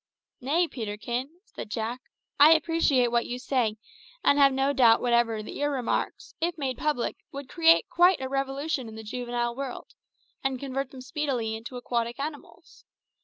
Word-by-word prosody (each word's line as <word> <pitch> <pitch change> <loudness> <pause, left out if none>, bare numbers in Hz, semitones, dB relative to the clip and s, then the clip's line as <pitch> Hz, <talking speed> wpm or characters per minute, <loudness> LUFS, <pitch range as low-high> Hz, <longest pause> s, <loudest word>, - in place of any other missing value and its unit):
"Nay, 320 +7 +2
Peterkin," 235 +2 -4 0.2
said 220 - -9
Jack; 230 +3 -3 0.4
"I 300 +3 +9
appreciate 310 -6 +2
what 235 0 +1
you 245 - -4
say, 250 -4 0 0.5
and 285 - +4
have 275 -1 +7
no 270 +1 +1
doubt 235 -4 +5
whatever 235 -3 +1
that - - -8
your 290 0 -1
remarks, 260 -4 -2
if 335 0 0
made 265 -4 -3
public, 300 -6 -1
would 280 -1 -7
create 330 +3 +4
quite 355 +1 +4
a 265 - -3
revolution 275 0 -2
in 220 - -9
the 220 - -8
juvenile 240 +1 -3
world, 270 -1 -6 0.5
and 265 -1 -1
convert 270 0 -3
them 260 -1 -11
speedily 255 -5 -2
into 230 +3 -8
aquatic 235 0 -2
animals. 290 +1 -8
260 Hz, 165 wpm, -27 LUFS, 235-285 Hz, 0.5 s, I